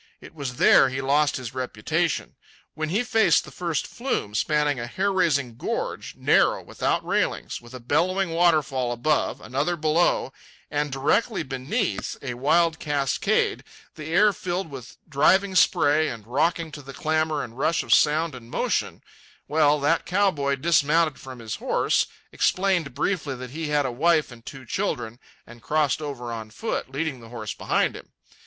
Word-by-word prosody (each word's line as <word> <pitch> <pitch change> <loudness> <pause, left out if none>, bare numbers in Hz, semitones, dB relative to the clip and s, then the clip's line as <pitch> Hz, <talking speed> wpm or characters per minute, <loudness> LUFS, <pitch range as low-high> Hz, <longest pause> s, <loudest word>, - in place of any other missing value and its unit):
It - - -13
was 140 -5 -5
there 130 - +6
he 130 +1 -4
lost 145 +2 +2
his 125 -3 -7
reputation. 130 +6 -2 0.4
When 155 0 -3
he 205 +8 +1
faced 225 -3 +3
the - - -11
first 170 -4 -2
flume, 240 - -3
spanning 150 +4 +1
a 120 - -4
hair 195 +10 -1
raising 140 -10 +1
gorge, - - -4
narrow, - - +3
without - - -1
railings, - - -1
with 120 +1 -12
a - - -7
bellowing 175 +9 0
waterfall 155 -7 +2
above, 135 +5 0
another 140 +9 -1
below, 155 -3 +1 0.4
and 145 -1 -1
directly 160 - +1
beneath 145 - -2
a 125 -3 -3
wild 160 +6 +2
cascade, 140 -3 0 0.3
the 155 - -8
air 205 +6 +4
filled 180 -3 -4
with 135 -1 -10
driving 190 +7 +3
spray 155 -4 +4
and 115 -6 -6
rocking 160 +6 0
to 150 - -8
the 135 0 -10
clamour 155 -1 0
and 120 +2 -10
rush 165 +3 +1
of - - +2
sound 155 +1 +3
and 120 -2 -11
motion—well, 150 +4 -1
that 160 +4 +1
cow 195 +2 +3
boy 140 -3 -1
dismounted 155 +1 +2
from 130 -1 -9
his 115 -2 -5
horse, - - +1 0.2
explained 185 -8 +1
briefly 155 -8 -1
that 125 0 -8
he 160 +2 -4
had 150 -1 +1
a 130 - -1
wife 155 +3 +2
and 115 -1 -14
two 135 -2 -9
children, 115 0 -3 0.3
and 120 0 -14
crossed 150 +2 +1
over 130 -5 -5
on 110 -1 -6
foot, 220 - -4
leading 140 -1 -3
the 115 -1 -13
horse 110 -3 -5
behind - - 0
him. - - -11
150 Hz, 165 wpm, -24 LUFS, 130-165 Hz, 0.4 s, there